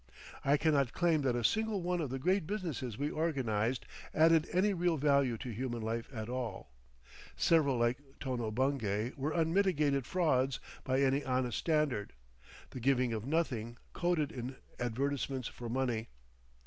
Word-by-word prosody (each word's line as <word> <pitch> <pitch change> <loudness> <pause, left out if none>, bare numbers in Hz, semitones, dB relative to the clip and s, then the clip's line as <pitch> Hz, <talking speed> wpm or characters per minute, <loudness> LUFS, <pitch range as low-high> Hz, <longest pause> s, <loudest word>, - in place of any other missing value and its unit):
I 140 +2 +4
cannot 140 -4 +2
claim 165 -3 +2
that 130 -3 +1
a 120 - -1
single 220 - +1
one 175 0 0
of 145 - -2
the 135 - -3
great 180 +4 +1
businesses 160 - -3
we 145 +2 -1
organised 130 -7 0 0.3
added 160 0 +5
any 195 +3 +3
real 175 -2 +1
value 140 -4 +3
to 125 +1 -6
human 120 0 -3
life 115 +1 -3
at 110 -4 -5
all. 120 -5 -4 0.6
Several 145 -6 +3
like 120 +2 +1 0.2
Tono 125 -4 -2
Bungay 115 -2 0
were 140 +3 -2
unmitigated 160 -5 +2
frauds 135 -7 +1 0.2
by 130 +1 +1
any 135 +1 +2
honest 125 -3 0
standard, 150 -10 0 0.6
the - - -6
giving 125 -1 +2
of 110 +2 -4
nothing 125 -7 -1 0.2
coated 175 -5 0
in 125 +1 -5 0.2
advertisements 130 +1 -1
for 120 -1 -7
money. 120 -2 -1
135 Hz, 150 wpm, -33 LUFS, 120-160 Hz, 0.6 s, added